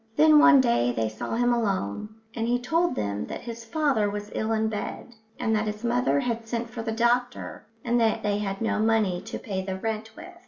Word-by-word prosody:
Then 305 0 +7
one 310 -3 +7
day 235 - +2
they 115 -2 -1
saw 110 - -5
him 245 +1 +2
alone, 205 - -1 0.2
and 230 -1 -2
he 245 +1 +2
told 330 +8 +1
them 100 0 -2
that - - -6
his 235 -1 -7
father 260 -5 +1
was 205 0 -6
ill 220 +1 -1
in 220 0 +1
bed, 220 +3 -5 0.3
and 220 - +1
that 215 0 0
his 210 +1 -5
mother 245 +4 +2
had 230 -3 -3
sent 235 0 -3
for 230 - -5
the 225 0 -3
doctor, 240 +1 -1 0.2
and 240 0 +2
that 220 -1 +1
they 205 0 0
had 195 -1 -3
no 225 - 0
money 215 -5 +2
to - - -6
pay 195 -5 -4
the 190 0 -4
rent 220 +1 -4
with. 360 +1 -11
225 Hz, 220 wpm, -26 LUFS, 210-245 Hz, 0.3 s, Then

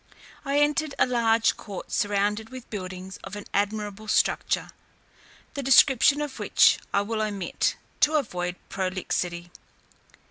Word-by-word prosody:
I 280 0 +1
entered 295 0 +1
a - - +4
large 230 -2 +2
court 200 -4 -8
surrounded 205 +1 0
with 255 -2 -10
buildings 185 -2 -7
of 195 - -8
an 205 - -7
admirable 210 +1 -2
structure, - - +1 0.8
the 280 - -4
description 270 +1 +5
of 295 -3 -5
which - - +4
I 200 - +2
will 215 +2 -2
omit, 205 -4 -1 0.2
to 305 +1 +3
avoid 180 -11 -1
prolixity. 180 -2 -3
210 Hz, 130 wpm, -26 LUFS, 195-260 Hz, 0.8 s, description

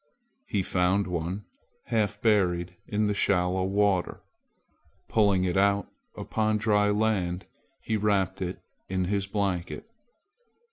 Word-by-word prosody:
He 100 -2 0
found 90 +3 +1
one 90 +3 -3 0.4
half 110 -3 0
buried 90 -5 +2
in 105 0 0
the 105 - +1
shallow 95 -2 +1
water. 100 -1 +1 0.8
Pulling 100 -4 +3
it 90 -1 0
out 100 0 +2 0.3
upon 110 -1 0
dry 105 -1 +2
land, 105 -4 0 0.4
he 110 - -1
wrapped 95 -2 +1
it 90 0 -4 0.3
in 95 -1 0
his 100 +1 -1
blanket. 100 - -2
100 Hz, 120 wpm, -27 LUFS, 90-105 Hz, 0.8 s, Pulling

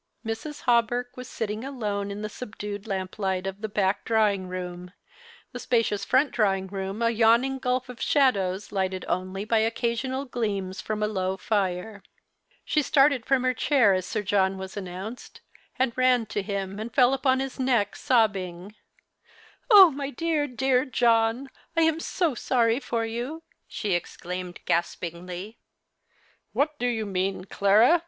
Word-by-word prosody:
Mrs. 225 +7 -5
Hawberk 245 0 +1
was 250 -1 -8
sitting 215 0 -4
alone 210 -7 -3
in 205 +1 -6
the - - -1
subdued 205 -2 -7
lamp 190 0 -4
light 190 -2 -1
of 195 +1 -5
the 220 - -3
back 200 -1 0
drawing 210 -4 +1
room, 180 0 -6 0.6
the - - -7
spacious 225 -4 0
front 265 +6 +2
drawing 195 -4 +1
room 195 +3 -4
a 230 - +3
yawning 235 +4 +3
gulf 255 0 -1
of 250 -2 -10
shadows 200 -9 +1
lighted 190 -2 -2
only 185 +2 -2
by 225 0 +2
occasional 235 +4 -1
gleams 205 -7 -3
from 215 -1 -3
a - - +2
low 190 -2 -2
fire. 200 +1 -2 0.6
She 305 - +2
started 275 -4 +3
from 265 -2 +3
her 255 0 +2
chair 245 -5 +3
as 185 -1 -1
Sir 215 - -2
John 190 -1 +1
was 190 0 -7
announced, 195 +4 -7 0.4
and 255 -2 +1
ran 255 -2 +3
to 210 -1 -3
him 195 0 -4
and 225 +2 -5
fell 255 +1 +4
upon 265 -1 +2
his 270 -1 -4
neck 240 -6 +1
sobbing 200 -5 0 0.3
— - - -31
" - - -28
Oh, 390 -6 +9
my 275 0 -4
dear, 310 +1 -1
dear 255 0 +1
John, 235 -1 +2 0.3
I - - +5
am 320 0 +2
so 335 -2 0
sorry 235 -1 +1
for 235 -4 -2
you," 245 +8 -5 0.2
she 205 -4 -2
exclaimed 180 +1 -5
gaspingly. 175 +4 -3 0.9
"What 295 +1 0
do 245 - 0
you 225 -3 -1
mean, 190 -1 -2
Clara? 215 - +4
220 Hz, 160 wpm, -26 LUFS, 195-255 Hz, 0.9 s, Oh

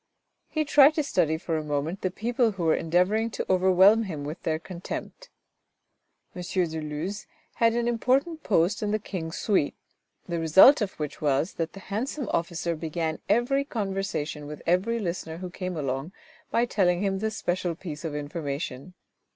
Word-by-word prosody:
He 310 -1 -1
tried 290 +1 +6
to 305 - +1
study 160 - +1
for 160 -1 -2
a - - -5
moment 150 +5 -2
the 185 - 0
people 230 +3 0
who 190 -3 -4
were 160 -1 +4
endeavouring 180 +7 +1
to - - -4
overwhelm 190 +4 +5
him 155 -7 -5
with 150 +4 -6
their 155 -1 0
contempt. 180 - -7 1.1
M. 180 - -5
de 175 -3 -1
Luz 155 +7 -5 0.3
had 230 -1 +4
an 240 0 0
important 270 +7 +1
post 190 - +2
in 210 - -1
the 215 - +2
King's 175 -6 -5
suite, 195 -9 +1 0.5
the 170 -1 -2
result 190 - +7
of 200 -2 -1
which 150 -2 -6
was 145 +3 +1
that 165 -1 -3
the 195 - -10
handsome 255 +4 -2
officer 170 0 -1
began 160 0 -3
every 240 +6 +2
conversation 195 - -3
with 150 0 -8
every 190 +7 +2
listener 170 -5 -4
who 180 0 -6
came 185 -1 -4
along 135 +4 -3 0.4
by 235 - +2
telling 180 -5 +1
him 195 -1 0
this 220 +1 -2
special 175 -1 -1
piece 155 -3 -7
of 160 -3 -4
information. 145 +1 -5
180 Hz, 170 wpm, -27 LUFS, 160-215 Hz, 1.1 s, result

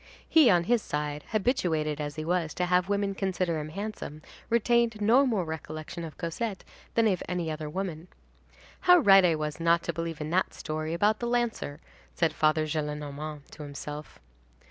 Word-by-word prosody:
He, 315 -6 +6
on 175 -3 +4
his 235 +5 +2
side, 150 -2 -3
habituated 165 - 0
as 145 0 -4
he 155 0 -4
was 170 -2 0
to 180 - 0
have 180 +1 +2
women 200 -1 0
consider 185 -4 -1
him 150 0 -5
handsome, 195 -5 -6 0.3
retained 235 -1 +2
no 240 +7 +5
more 210 -8 0
recollection 160 +1 -6
of 160 -2 -8
Cosette 190 +4 -3 0.3
than 230 - +4
of 190 -4 +1
any 175 -3 -1
other 155 -1 -5
woman. 175 -1 -4 0.8
"How 360 - +10
right 195 - +7
I 170 -3 +4
was 150 0 -4
not 170 0 +3
to 170 - -2
believe 165 -1 -4
in 150 +1 -4
that 185 +2 +1
story 155 0 -3
about 210 +5 +2
the 240 - -2
lancer!" 235 -11 -1 0.3
said 165 -2 +1
Father 155 0 +2
Gillenormand, 150 -1 -4
to 155 - -11
himself. 145 0 -7
170 Hz, 175 wpm, -28 LUFS, 155-200 Hz, 0.8 s, How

